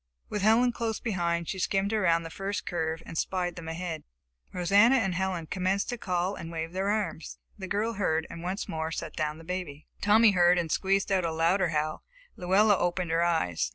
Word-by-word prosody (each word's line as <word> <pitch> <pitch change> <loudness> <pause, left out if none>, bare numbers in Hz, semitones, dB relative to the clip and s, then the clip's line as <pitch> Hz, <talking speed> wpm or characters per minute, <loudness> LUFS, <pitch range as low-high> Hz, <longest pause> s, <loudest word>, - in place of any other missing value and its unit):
With 210 - -2
Helen 225 +4 +4
close 230 -2 -3
behind, 170 -6 -1
she 190 - -4
skimmed 195 +2 0
around 170 -6 +2
the 165 - -8
first 195 +3 -4
curve 160 -1 -2
and - - -9
spied 180 +1 -1
them 170 -2 -8
ahead. 165 0 -4 0.5
Rosanna 200 +8 +4
and 195 -8 +1
Helen 180 -2 -2
commenced 190 +3 -1
to 245 - -2
call 185 -3 -1
and 165 -4 -7
wave 165 0 -4
their 190 +2 -1
arms. 205 -6 -2 0.2
The 190 - -5
girl 215 +4 -1
heard 165 -6 0
and 165 - -8
once 185 +3 -3
more 160 0 -3
set 165 -1 -5
down 150 -1 -2
the 165 - -12
baby. 165 -4 -5 0.2
Tommy 215 +1 +6
heard 180 -1 +4
and 165 -3 -1
squeezed 195 0 +1
out 190 -2 +2
a 165 - -1
louder 170 +3 +2
howl. 155 0 -2 0.3
Luella 195 +3 +3
opened 175 -1 -1
her 165 +1 +2
eyes. 160 - 0
180 Hz, 200 wpm, -28 LUFS, 165-200 Hz, 0.5 s, Tommy